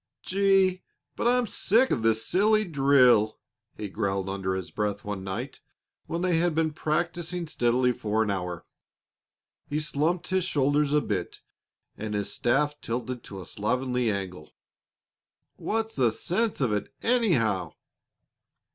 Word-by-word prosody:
"Gee! 190 -1 +3 0.3
but - - 0
I'm 245 0 +3
sick 230 +4 +2
of 115 - +1
this 110 0 +2
silly 215 +3 +3
drill!" 135 - +4 0.4
he 105 - -4
growled 95 -1 -2
under 95 -1 -2
his 95 - -5
breath 105 -1 -2
one 100 -2 -4
night 110 +8 -5 0.5
when 170 +2 -2
they 180 -3 +2
had 170 -2 +1
been 160 -1 +1
practising 170 +3 -2
steadily 125 -3 +2
for 110 -2 0
an 105 - -1
hour. 90 -3 -4 1.0
He 150 - 0
slumped 155 +3 -1
his 185 -1 +1
shoulders 145 -2 +1
a 150 0 +3
bit 95 -8 -3 0.6
and 105 0 -4
his 100 -1 -2
staff 145 +5 +1
tilted 120 +1 -4
to 95 -2 -8
a - - -9
slovenly 125 +2 -1
angle. 95 -6 -4 1.1
"What's 225 0 -2
the 125 -4 +3
sense 195 - -1
of 120 -5 +2
it, 105 - -2
anyhow?" 120 - +2
130 Hz, 140 wpm, -27 LUFS, 105-175 Hz, 1.1 s, drill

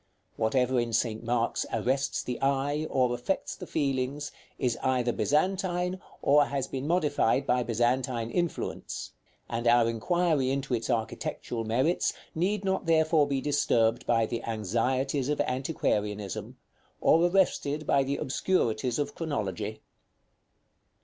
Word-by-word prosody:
Whatever 125 +3 +1
in 120 -1 -2
St. 115 -1 0
Mark's 120 0 0
arrests 130 +4 0
the 125 -1 -4
eye, 140 +3 0
or 125 -2 +2
affects 120 +11 -2
the 180 - -9
feelings, 140 -1 -1 0.3
is 125 -3 0
either 125 -2 +1
Byzantine, 180 - 0 0.2
or 145 +1 +5
has 135 -2 -2
been 135 +1 -4
modified 145 -6 +2
by 125 -1 +2
Byzantine 120 0 0
influence; 175 +2 -3 0.4
and 115 +1 -2
our 120 -1 +5
inquiry 145 +4 +1
into 135 -1 -2
its 115 -2 -1
architectural 115 0 -2
merits 130 +10 +1 0.2
need 195 +4 0
not 190 -2 -1
therefore 160 -2 +4
be 135 -2 -1
disturbed 120 -6 +1
by 115 -1 +3
the 115 +1 -3
anxieties 125 +6 0
of 150 - 0
antiquarianism, 105 - -2 0.4
or 165 - +4
arrested 175 -5 +1
by 140 - +3
the 140 +1 -2
obscurities 125 -6 0
of 145 -1 -2
chronology. 110 - -3
130 Hz, 130 wpm, -28 LUFS, 115-150 Hz, 0.4 s, or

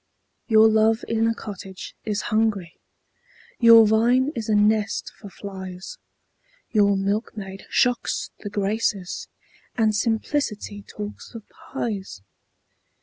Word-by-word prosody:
Your 220 -2 +6
love 220 +1 +3
in 225 0 +1
a 230 - 0
cottage 195 -3 -8
is 210 -1 -2
hungry, 215 -6 0 0.8
Your 230 -1 +8
vine 240 +6 +3
is 225 -1 -4
a 215 - +3
nest 210 0 +1
for 205 - -10
flies 190 - -8 0.7
Your 200 -2 +3
milkmaid 195 -1 -3
shocks 245 -2 0
the 205 - -6
Graces, 200 -2 -2 0.5
And 220 -2 +2
simplicity 220 -1 -1
talks 210 +3 -9
of 225 - -9
pies! 225 - -6
215 Hz, 110 wpm, -23 LUFS, 200-225 Hz, 0.8 s, Your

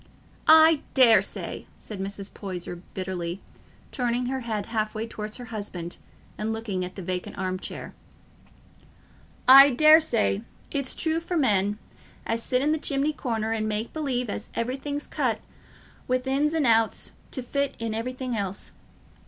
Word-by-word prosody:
"I 315 -1 +7
daresay," 250 -4 +3
said 210 -3 -6
Mrs. 200 +1 -5
Poyser 180 -3 -6 0.2
bitterly, 185 -1 -3 0.5
turning 245 -1 0
her 265 +1 -2
head 220 -5 -3
half 215 -2 -2
way 220 +1 -2
towards 215 -1 -6
her 245 - -8
husband 180 -5 -5 0.4
and 215 +1 -1
looking 220 -5 -3
at 180 +1 -6
the 190 - -6
vacant 180 +1 -4
arm 185 -1 -2 1.9
chair—"I 275 +2 +10
daresay 285 -7 +4 0.3
it's 275 -2 -2
true 320 0 0
for 340 +1 -3
men 205 -7 +2 0.5
as 230 0 -1
sit 250 +2 +1
i' 300 - +2
th' 310 - -6
chimney 285 +2 +1
corner 225 -6 -2
and 215 -1 -1
make 215 +2 -3
believe 265 -6 -1
as 205 - -5
everything's 275 +5 -3
cut - - -1 0.7
wi' 255 0 +1
ins 285 +4 +1
an' 310 -3 +2
outs 225 -2 +2 0.2
to 260 - -4
fit 280 +2 -1
int' 225 -1 -2
everything 250 +2 -3
else. 195 -2 -3
230 Hz, 145 wpm, -26 LUFS, 205-270 Hz, 1.9 s, chair—"I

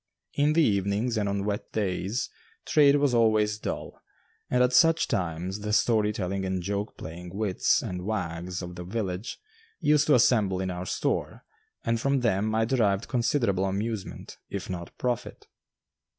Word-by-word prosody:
In 145 +1 +2
the 165 +1 +4
evenings 100 +2 +1
and 105 -2 0
on 100 0 -1
wet 105 0 -3
days 105 +3 -1 0.3
trade 145 -2 +5
was 145 -3 +2
always 110 -2 +3
dull, - - -5 0.5
and 125 0 +3
at 125 0 +2
such 165 +5 +5
times 90 +2 -2
the 105 0 -3
story 110 -1 +3
telling 95 -1 -3
and 95 -1 -2
joke 100 +3 -3
playing 85 +3 -8
wits 100 -3 +1
and 90 0 -4
wags 90 -3 -3
of 90 0 -7
the 90 0 -7
village 95 +1 -4 0.4
used 150 0 +3
to 150 - +6
assemble 105 -6 +3
in 95 -1 -2
our 90 +1 -5
store, - - -2 0.4
and 115 -1 0
from 135 0 +1
them 110 -1 +1
I 110 0 +2
derived 110 -5 +1
considerable 115 -6 +1
amusement, 100 +1 -4
if - - -5
not 85 -2 -5
profit. 125 -1 -3
105 Hz, 160 wpm, -27 LUFS, 95-120 Hz, 0.5 s, to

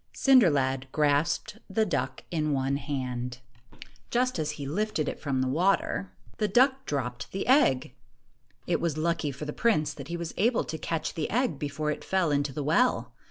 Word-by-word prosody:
Cinder 255 -9 +6
lad 135 -2 0
grasped 150 +8 +1
the 220 +3 +2
duck 130 -8 -2
in 155 -3 0
one 135 0 0
hand. 125 -4 -4 0.3
1 - - -22
15 - - -15
Just 250 -4 +1
as 150 -1 -1
he 140 - -5
lifted 160 0 -1
it - - -4
from 135 -3 -1
the 130 - 0
water, 185 +6 +1 0.3
the 210 - +1
duck 265 +5 +3
dropped 125 -4 -3
the 195 - -3
egg. 250 - +3 0.7
It - - 0
was 165 -3 -1
lucky 160 -2 0
for 140 +3 -7
the 150 - -4
prince 155 -11 +1
that 140 -1 -9
he 170 - -4
was 170 -1 -5
able 230 +4 +2
to 160 - -6
catch 165 +1 -2
the 160 - -2
egg 235 - 0
before 150 +1 -2
it - - -5
fell 185 -5 +1
into 140 -1 +1
the 145 +2 -4
well. 240 - +2
155 Hz, 195 wpm, -28 LUFS, 140-195 Hz, 0.7 s, Cinder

